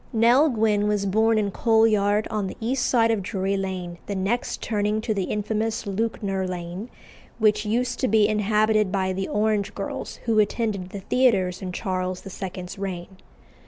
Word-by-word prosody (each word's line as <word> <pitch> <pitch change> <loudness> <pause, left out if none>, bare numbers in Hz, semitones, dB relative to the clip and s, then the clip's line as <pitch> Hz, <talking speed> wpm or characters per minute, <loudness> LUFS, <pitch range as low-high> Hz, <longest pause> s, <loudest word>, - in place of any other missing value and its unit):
Nell 240 +6 +5
Gwynn 215 -4 +1
was 205 -1 0
born 220 +3 +3
in 205 -2 0
Coal 225 +1 +3
Yard, 210 -1 +2
on 210 -3 -1
the - - -7
east 245 +3 0
side 230 -2 +3
of 220 -3 0
Drury 195 0 -1
Lane, 185 -3 -4
the 200 - -3
next 195 +6 -1
turning 210 -1 0
to 220 0 -1
the 195 -3 -1
infamous 220 +3 -2
Lewknor 195 -2 -2
Lane, 180 +4 -5 0.5
which 210 -1 +2
used 245 +3 0
to 260 - +1
be 215 -1 +4
inhabited 215 -1 +2
by 190 -1 0
the 190 +1 -3
orange 210 -1 0
girls 195 - -5
who 225 -2 +3
attended 205 -3 0
the 200 0 -7
theatres 190 -7 +2
in 185 -1 -4
Charles 185 -1 -3
II.'s 185 -1 -7
reign. 190 -1 -5
210 Hz, 170 wpm, -24 LUFS, 190-220 Hz, 0.5 s, Nell